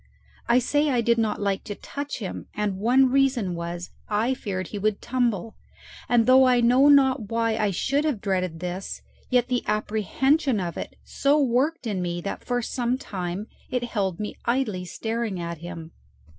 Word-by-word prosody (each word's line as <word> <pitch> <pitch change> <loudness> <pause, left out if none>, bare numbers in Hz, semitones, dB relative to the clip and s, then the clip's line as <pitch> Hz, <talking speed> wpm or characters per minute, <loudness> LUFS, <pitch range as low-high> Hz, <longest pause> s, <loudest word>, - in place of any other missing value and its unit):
I 235 - +6
say 290 +4 +2
I 250 -3 +2
did 235 0 +2
not 220 -2 0
like 200 -1 -1
to 205 - -5
touch 285 +6 -6
him, 200 -6 -6
and 205 -2 -1
one 255 +4 +4
reason 260 -8 +2
was 170 +1 -5 0.2
I 220 +5 +1
feared 190 -6 -4
he 205 - -5
would 210 0 0
tumble; 235 -5 -1 0.5
and 240 -2 +4
though 260 +1 +7
I 250 -1 +4
know 250 +4 +5
not 265 -6 +4
why 230 -1 +1
I 215 -2 +1
should 275 - 0
have 290 -9 0
dreaded 185 -5 -2
this, 180 +2 -5 0.3
yet 250 -2 +3
the 250 -1 0
apprehension 220 - +1
of 175 -2 -3
it - - -6
so 285 +2 +2
worked 270 +3 +1
in 200 -5 -1
me 175 -1 -2
that 200 - -5
for 245 -1 -1
some 245 +1 -1
time 185 -4 -4 0.2
it 250 -1 -1
held 195 -7 -2
me 210 - -4
idly 235 -7 0
staring 220 0 -3
at 170 -1 -5
him. 170 -1 -8
225 Hz, 180 wpm, -25 LUFS, 190-255 Hz, 0.5 s, though